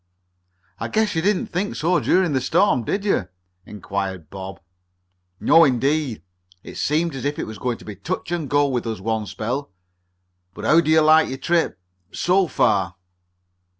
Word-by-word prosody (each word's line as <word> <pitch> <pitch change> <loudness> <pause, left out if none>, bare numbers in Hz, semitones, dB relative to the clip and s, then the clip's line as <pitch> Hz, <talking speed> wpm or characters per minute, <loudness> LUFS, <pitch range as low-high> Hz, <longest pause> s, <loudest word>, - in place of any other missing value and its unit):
"I - - -3
guess 215 -1 +1
you 160 - 0
didn't 200 +2 +1
think 190 +4 -3
so 175 +3 +1
during 180 -4 +2
the 130 - +1
storm, 165 - +2
did 200 - -2
you?" 105 - +1 0.4
inquired 95 -5 -5
Bob. 95 -1 -8 0.8
"No 165 +2 +6
indeed! 135 - +1 0.4
It - - -10
seemed 160 +2 0
as 135 - -6
if 145 +1 -2
it - - -3
was 110 -2 -9
going 125 0 -2
to - - -15
be 105 - -7
touch 180 - -5
and 165 -5 -2
go 145 0 +3
with 125 -3 -2
us 110 -3 -3
one 110 +1 -2
spell. 125 +8 -4 0.9
But - - -7
how 165 +2 +5
do 155 - -3
you 160 0 +5
like 155 +1 +5
your 130 - -4
trip 165 - 0 0.3
so 185 +1 +2
far?" 95 - +1
145 Hz, 175 wpm, -22 LUFS, 110-170 Hz, 0.9 s, No